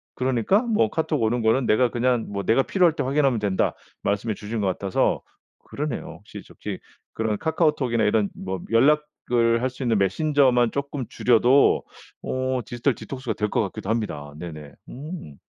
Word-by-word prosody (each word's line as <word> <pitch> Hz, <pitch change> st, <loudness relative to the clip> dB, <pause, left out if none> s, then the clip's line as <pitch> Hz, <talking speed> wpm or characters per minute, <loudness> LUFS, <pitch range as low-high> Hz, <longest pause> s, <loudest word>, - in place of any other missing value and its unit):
그러니까 130 Hz, -, +2 dB
뭐 220 Hz, -, +1 dB
카톡 155 Hz, -2 st, -1 dB
오는 115 Hz, +2 st, +1 dB
거는 115 Hz, +4 st, +2 dB
내가 120 Hz, +3 st, +3 dB
그냥 120 Hz, -1 st, +1 dB
뭐 100 Hz, -1 st, -3 dB
내가 125 Hz, +4 st, +3 dB
필요할 175 Hz, -2 st, +2 dB
때 -, -, -1 dB
확인하면 135 Hz, -2 st, +2 dB
된다." 100 Hz, -3 st, 0 dB, 0.3 s
말씀해 100 Hz, +1 st, -1 dB
주신 105 Hz, +2 st, -4 dB
것 100 Hz, -, 0 dB
같아서 95 Hz, +1 st, 0 dB, 0.4 s
그러네요 145 Hz, -4 st, -5 dB
혹시 -, -, -11 dB
저 -, -, -15 dB
기 -, -, -4 dB, 0.3 s
그런 110 Hz, -2 st, -1 dB
카카오톡이나 150 Hz, -9 st, +1 dB
이런 105 Hz, -1 st, +2 dB
뭐 95 Hz, -1 st, -5 dB
연락을 120 Hz, -3 st, +2 dB
할 130 Hz, -, +1 dB
수 130 Hz, +1 st, -8 dB
있는 115 Hz, -3 st, +2 dB
메신저만 125 Hz, +3 st, +3 dB
쪼끔 140 Hz, -2 st, -3 dB
줄여도 125 Hz, +3 st, +4 dB, 0.4 s
오 130 Hz, -1 st, -1 dB
디지털 120 Hz, +4 st, -1 dB
디톡스가 130 Hz, -3 st, -5 dB
될 105 Hz, -1 st, -2 dB
것 -, -, +1 dB
같기도 95 Hz, -1 st, -5 dB
합니다. 75 Hz, -11 st, -3 dB
네네 75 Hz, -4 st, -8 dB, 0.2 s
음. 145 Hz, -, -8 dB
120 Hz, 355 characters per minute, -24 LUFS, 105-140 Hz, 0.4 s, 줄여도